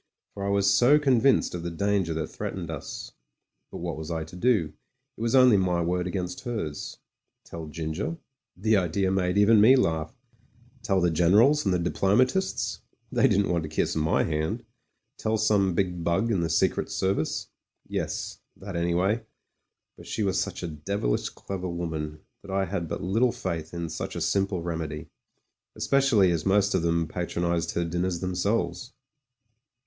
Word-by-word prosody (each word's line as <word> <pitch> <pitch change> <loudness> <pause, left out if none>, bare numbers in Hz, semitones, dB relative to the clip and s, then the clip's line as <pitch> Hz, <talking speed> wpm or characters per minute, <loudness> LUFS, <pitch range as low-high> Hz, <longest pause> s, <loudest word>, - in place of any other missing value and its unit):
For 100 - -6
I 100 - -1
was 100 0 +2
so 120 +9 +6
convinced 135 -3 +3
of 90 - -4
the 85 - -3
danger 95 0 0
that 80 -1 -1
threatened - - -5
us. - - -7 0.6
But - - -8
what 85 -2 -3
was 80 0 -6
I 80 -1 -2
to 80 +3 -12
do? 90 -7 +1 0.4
It - - -11
was 115 +2 +1
only 125 -5 +7
my 90 -2 +1
word 90 +1 -1
against 90 -1 -3
hers. 110 - -4 0.5
Tell 80 -1 -8
Ginger? 80 - -4 0.4
The 110 +3 +3
idea 95 +1 0
made 90 0 +1
even 105 +1 +6
me 125 +5 +8
laugh. 80 -10 0 0.7
Tell 100 -4 +1
the 85 -1 +3
generals 105 - +4
and 95 - +2
the 90 - +2
diplomatists? 105 - +1 0.3
They - - +4
didn't 100 0 +2
want 85 -1 +1
to 80 - -6
kiss 80 - -1
my 80 0 +2
hand. 80 0 -2 0.5
Tell 110 0 0
some 100 -4 +2
big 90 -2 -1
bug 85 +8 +1
in 95 -5 +1
the 85 - -1
Secret 80 - +1
Service? 95 -4 -1 0.4
Yes - - -4
— - - -30
^that 95 -2 -7
anyway; 90 +6 +1 0.7
but - - -13
she 110 - -2
was 95 -2 +1
such - - -4
a - - -2
devilish 75 -3 -2
clever 95 -2 -6
woman, 80 -3 -4 0.2
that 100 - -13
I 95 0 0
had 90 -2 -3
but - - -4
little 115 +7 +2
faith 80 -6 -4
in 85 -1 -4
such 80 0 -5
a - - -3
simple 95 -3 0
remedy, 80 -3 -4 0.7
especially 130 -9 +3
as 85 -3 -1
most 100 +1 +3
of - - +2
them 85 -1 +1
patronised 85 0 -2
her 85 - 0
dinners 85 +1 -1
themselves. 95 +4 -1
90 Hz, 170 wpm, -26 LUFS, 85-100 Hz, 0.7 s, me